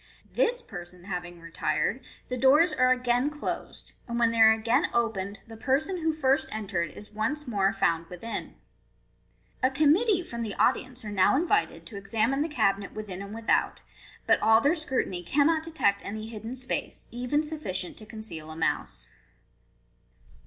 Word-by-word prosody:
This - - +2
per 175 - -7
son 175 0 -15
having 175 -2 -5
retired, 170 +8 -1 0.3
the 250 - -3
doors 290 +6 +5
are 255 -3 +3
again 250 +1 +2
closed; 300 0 -6
and 235 -1 -3
when 235 -1 +3
they 230 - -2
are 220 0 +9
again 230 +8 +2
opened, 200 -4 -1
the 225 -1 -11
person 285 - 0
who 325 -2 +1
first 280 -2 +1
entered 195 -6 -2
is 210 - -12
once 255 +8 -2
more 200 -4 +2
found 165 0 0
within. 180 +7 -6 1.1
A 255 - +4
committee 340 - +3
from 235 -7 -6
the 215 -4 -3
audience 255 -2 0
are 210 - -5
now 190 +4 +4
invited 355 +8 +1
to 210 - -9
examine 225 +7 0
the 315 - 0
cabinet 200 -9 0
within 200 -3 -6
and 200 0 -7
without, 230 0 +1 0.4
Dut - - +3
all 220 0 +6
their 285 +6 +3
scrutiny 265 - -2
cannot 295 - +2
detect 315 -12 0
any 215 +2 -5
hidden 225 +2 -6
space, 255 0 -2
even 250 +5 0
sufficient 245 - -3
to 215 - -11
conceal 190 -9 -7
a 155 - -7
mouse. 165 - -2
230 Hz, 165 wpm, -28 LUFS, 200-285 Hz, 1.1 s, are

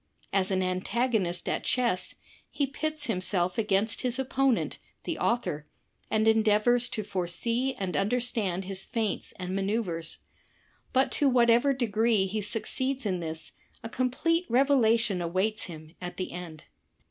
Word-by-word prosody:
As 190 -1 +2
an 190 -1 +1
antagonist 185 0 0
at - - -1
chess, 235 -8 +1 0.3
he 285 - 0
pits 305 +2 -3
himself 185 -3 0
against 210 0 +1
his 250 0 0
opponent, 265 -1 +1 0.2
the - - -3
author, 155 -11 0 0.4
and 220 0 +2
endeavors 220 +2 +4
to 215 - -3
foresee 230 +8 -1
and 190 -2 -3
imder^ 210 +6 +1
stand 205 -7 -1
his 195 0 -4
feints 225 -4 -2
and 185 0 -4
maneuvers. 195 -5 -1 0.7
But 265 +1 +3
to 285 - +3
whatever 240 +2 +5
degree 225 -4 +2
he 210 +3 -2
succeeds 255 +5 -1
in 185 -3 0
this, 160 -1 -5 0.3
a 225 - -5
complete 330 +9 0
revelation 235 -6 +3
awaits 190 +6 0
him 155 -2 -10
at 180 0 -6
the 185 - -3
end. 170 -3 -8
220 Hz, 140 wpm, -28 LUFS, 185-245 Hz, 0.7 s, whatever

